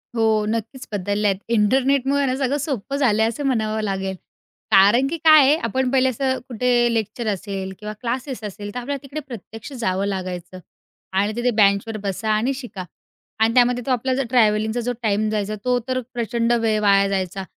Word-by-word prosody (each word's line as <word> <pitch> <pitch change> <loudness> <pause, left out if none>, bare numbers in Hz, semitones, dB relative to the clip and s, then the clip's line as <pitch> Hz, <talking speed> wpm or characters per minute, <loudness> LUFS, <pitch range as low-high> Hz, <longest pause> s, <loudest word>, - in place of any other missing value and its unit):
हो, 220 -2 +2
नक्कीच 230 +4 -4
बदलल्या 205 +1 0
आहेत. 190 - -4
इंटरनेटमुळेना 265 +4 +2
सगळं 275 +1 0
सोपं 275 -2 -3
झालंय 220 -6 +2
असं 235 +5 -4
म्हणावं 220 -4 0
लागेल. 195 -1 -2 0.6
कारण 205 +7 +5
की 330 +4 -3
काय 310 -1 +7
आहे, 290 +3 +5
आपण 255 -1 -1
पहिले 260 -1 +3
असं 260 +1 -1
कुठे 240 0 +1
लेक्चर 220 +1 -2
असेल 195 -1 -3
किंवा 210 0 -6
क्लासेस 250 0 -4
असेल, 205 0 -7
तर - - -2
आपल्याला 275 +2 -4
तिकडे 280 +3 -6
प्रत्यक्ष 225 0 -9
जावं 195 -6 -1
लागायचं 185 -2 -5 0.6
आणि 205 +2 +1
तिथे 245 +1 +1
बेंचवर 210 0 +2
बसा 200 +2 -3
आणि 225 +6 +1
शिका 240 -8 -7 0.6
आणि 225 +1 +3
त्यामध्ये 245 0 +3
तो 270 - -1
आपला 255 +1 0
जर 270 0 -1
ट्रॅव्हलिंगचा 220 -1 +2
जो 245 - -2
टाईम 215 0 +1
जायचा, 215 0 -2
तो 250 0 +2
तर 255 0 0
प्रचंड 235 0 0
वेळ 225 -2 +1
वाया 200 -1 +4
जायचा. 190 0 -2
225 Hz, 175 wpm, -21 LUFS, 205-255 Hz, 0.6 s, काय